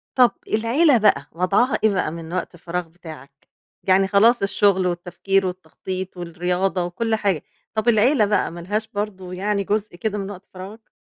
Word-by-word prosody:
طب 250 -2 +6 0.2
العيلة 240 +5 +3
بقى، 210 - +3
وضعها 195 +9 +2
إيه 220 - +6
بقى 180 -5 -1
من 165 0 -8
وقت 185 -1 -3
الفراغ 175 0 -4
بتاعك؟ 155 -5 -13 0.4
يعني 190 0 +4
خلاص 215 +3 +4
الشُّغل 195 -2 +2
والتّفكير 180 +2 0
والتّخطيط 185 +1 -6
والرياضة 180 +2 -1
وكُلّ 220 +6 -1
حاجة، 200 -8 0 0.3
طب 220 +2 -1
العيلة 230 +2 +4
بقى 205 0 +1
ما 170 - -8
لهاش 210 +5 -2
برضه 200 -3 -5
يعني 200 +2 -1
جزء 205 -2 -2
كده 210 +2 -2
من 195 0 -4
وقت 190 -1 -10
فراغك؟ 200 +5 -10
195 Hz, 165 wpm, -22 LUFS, 180-215 Hz, 0.4 s, طب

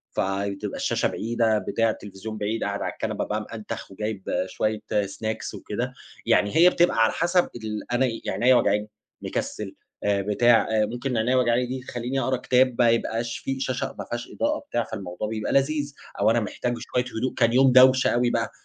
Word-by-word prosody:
فتبقى 100 0 -2
الشاشة - - +1
بعيدة، 115 0 0
بتاع 115 +3 0
التليفزيون 105 +1 -6
بعيد، 105 +2 -2
قاعد - - -2
على - - -2
الكنبة - - -3
بقى، 105 +1 -2
مأنتخ، 110 -1 -7
وجايِب 105 0 -4 0.3
شوية 110 +3 -1 0.3
snacks 110 +3 -4
وكده. 120 +5 -4 0.3
يعني 100 0 +2
هي 175 +2 +8
بتبقى 175 -5 +2
على 110 - +3
حسَب 175 +1 +2
ال 110 -1 -6
أنا 120 +2 +3
يعني، 115 -3 -4
عينيّا 130 +1 +7
وجعاني، 105 -2 +2 0.3
مكسَل، - - -4 0.3
آآ 100 -1 +2
بتاع. 115 +4 +3 0.2
ممكن 120 +3 -3
عينيّا 120 +4 +2
وجعاني 125 -1 +2
دي 130 +1 -5
تخلِّيني 125 +3 -2
أقرَأ 130 0 0
كتاب، 125 0 +2
ما 120 - +6
يبقاش 115 0 0
فيه 135 0 -4
شاشة 130 -1 -2
ما - - -4
فيهاش 120 0 -5
إضاءة 300 +2 0
بتاع، 120 - -2
فالموضوع 100 -1 -5
بيبقى 110 0 -3
لذيذ. 145 +1 +1 0.3
أو 105 +2 +4
أنا 120 - +3
محتاج 120 +3 -2
شوية 125 0 -1
هدوء، 130 +3 -1
كان 115 -1 +2
يوم 130 +1 +5
دوشة 130 +1 +6
أوي 120 0 +2
بقى، - - -1
115 Hz, 180 wpm, -25 LUFS, 105-130 Hz, 0.3 s, هي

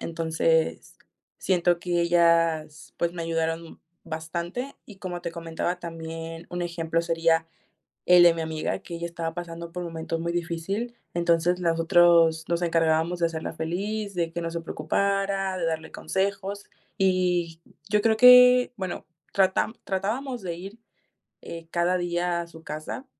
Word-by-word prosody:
entonces 160 -1 0 0.4
siento 175 -2 +2
que 175 0 -1
ellas, 165 -3 +2
pues, 170 0 0
me 170 - -5
ayudaron, 165 0 -3 0.3
bastante. 170 - -4
Y 210 - -12
como 180 -2 -5
te - - -3
comentaba, 165 +1 -3
también, 165 0 -7
un 175 0 -3
ejemplo, 165 -1 -1
sería 165 -1 +2 0.6
el 180 0 +8
de 170 -1 +7
mi 165 - -3
amiga, 160 -1 -2
que 175 - -11
ella 170 0 -4
estaba 165 -1 -4
pasando 170 -1 -7
por 180 +1 -5
momentos 165 -1 -4
muy 170 +1 -2
difícil. 175 +8 -3 0.2
Entonces, 170 +1 +2
las 165 -2 0
otros 165 -1 +5
nos 170 0 0
encargábamos 165 0 +2
de 170 - +3
hacerla 160 -1 -5
feliz, 200 +6 -3
de 170 -2 -1
que 170 - -4
no 165 - -2
se 170 0 -4
preocupara, 195 +4 -1
de 175 - -1
darle 160 -1 -3
consejos. 200 +1 -2 0.3
Y 180 -3 +1 0.3
yo 210 0 +3
creo 220 +1 +3
que, 250 +1 +8
bueno, 185 -3 -5 0.3
tratá 190 +3 +2
tratábamos 225 +6 -2
de 175 -2 -3
ir, 195 +6 -10 0.6
eh, 165 -1 -8
cada 175 +1 +2
día 175 0 -1
a - - -8
su 165 -1 -14
casa, 155 - -6
170 Hz, 155 wpm, -26 LUFS, 165-185 Hz, 0.6 s, el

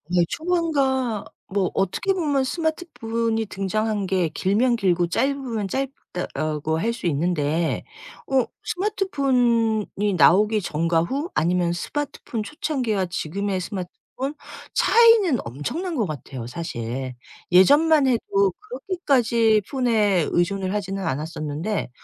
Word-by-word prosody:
예 175 - +5
초반과 275 - 0 0.3
뭐 195 -3 +1
어떻게 275 - 0
보면 295 -7 +1
스마트폰이 240 -8 -2
등장한 205 +1 -1
게 185 -3 +1
길면 220 +9 +1
길고 180 -5 +1
짧으면 255 -1 -1
짧다라고 160 - -3
할 230 +2 0
수 235 - -8
있는데 160 0 0 0.4
어 265 -2 +3 0.2
스마트폰이 245 - 0
나오기 210 +5 +5
전과 165 -1 +1
후 275 - -2
아니면 175 +1 +1
스마트폰 245 +3 -4
초창기와 255 - -1
지금의 195 +4 -2
스마트폰 180 -1 -6 0.8
차이는 455 - +5
엄청난 295 - -4
것 230 -7 +1
같아요, 135 -6 -6
사실. 125 -2 -5 0.4
예전만 290 - +6
해도 200 -6 +2
그렇게까지 265 - +1
폰에 215 - +2
의존을 185 +2 0
하지는 195 -2 -3
않았었는데 155 +6 -3
215 Hz, 270 characters per minute, -23 LUFS, 175-270 Hz, 0.8 s, 예전만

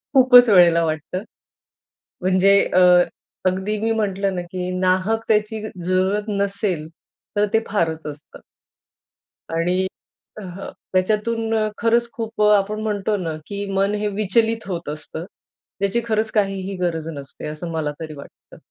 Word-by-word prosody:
खूपच 250 -2 +8
वेळेला 175 -4 +6
वाटतं, 160 +4 -3 1.0
म्हणजे 185 +1 +4 0.2
अ, 185 - +6 0.7
अगदी 190 +3 -1
मी 225 +1 0
म्हटलं 195 -1 -1
ना, 180 - -2
की 180 0 -3
नाहकतेची 210 +3 +1 0.2
जरूरत 190 +3 +1
नसेल, 200 -5 -1 0.5
तर 205 0 +3
ते 225 - +4
फारच 165 -6 -1
असतं. 150 0 -9 1.1
आणि 180 +3 0 0.5
अ, - - -7
हं. 185 +1 -8 0.2
याच्यातून 220 +4 +1 0.2
खरंच 235 +1 +2
खूप, 225 -1 -5
आपण 210 0 +3
म्हणतो 210 -1 -1
ना, 165 -4 -3
की 200 0 -4
मन 195 +1 +1
हे 210 0 -1
विचलित 220 +2 0
होत 175 -5 -4
असतं. 155 +2 -5 0.5
ज्याची 200 +4 +1
खरंच 220 -1 0
काहीही 195 -2 -1
गरज 165 -3 -1
नसते, 140 +1 -8
असं 155 +3 -6
मला 160 -2 -2
तरी 155 -1 -6
वाटतं. 140 - -14
195 Hz, 130 wpm, -21 LUFS, 175-215 Hz, 1.1 s, खूपच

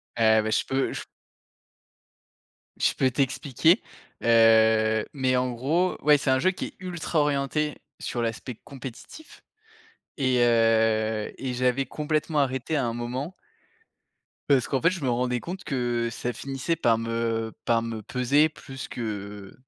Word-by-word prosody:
Heu, 110 -1 +4
bah, 110 - -2
je - - +2
peux 135 0 -1
j - - -5 1.8
je - - +2
peux 130 - +1
t'expliquer. 140 - +2 0.4
Heu, 110 -1 +5
mais 130 -3 +1
en 125 0 +1
gros, 155 +10 0
ouais, 150 0 +6
c'est 140 - -2
un 130 0 +4
jeu 185 +8 +3
qui - - -5
est - - -13
ultra 175 -3 -2
orienté 145 +1 0 0.2
sur 120 - -3
l'aspect 115 +2 -3
compétitif 135 - -11 0.7
et 130 -3 +2
heu, 110 -2 +2
et 130 -2 -3
j'avais 125 +2 +1
complètement 155 +1 -1
arrêté 130 +2 -1
à 140 -4 +1
un 115 - -2
moment 125 +8 -4 1.2
parce 135 -4 +3
qu'en 135 - 0
fait, 165 - +5
je 185 -5 -5
me 130 - +1
rendais 125 0 0
compte 185 +2 -7
que 120 -3 -1
ça 120 +1 -3
finissait 135 +6 -3
par 115 -7 +3
me 115 0 -2
par 115 -1 +3
me 115 -1 -5
peser 125 +7 +2
plus 135 -4 -9
que 105 -3 -6
125 Hz, 150 wpm, -26 LUFS, 115-145 Hz, 1.8 s, ouais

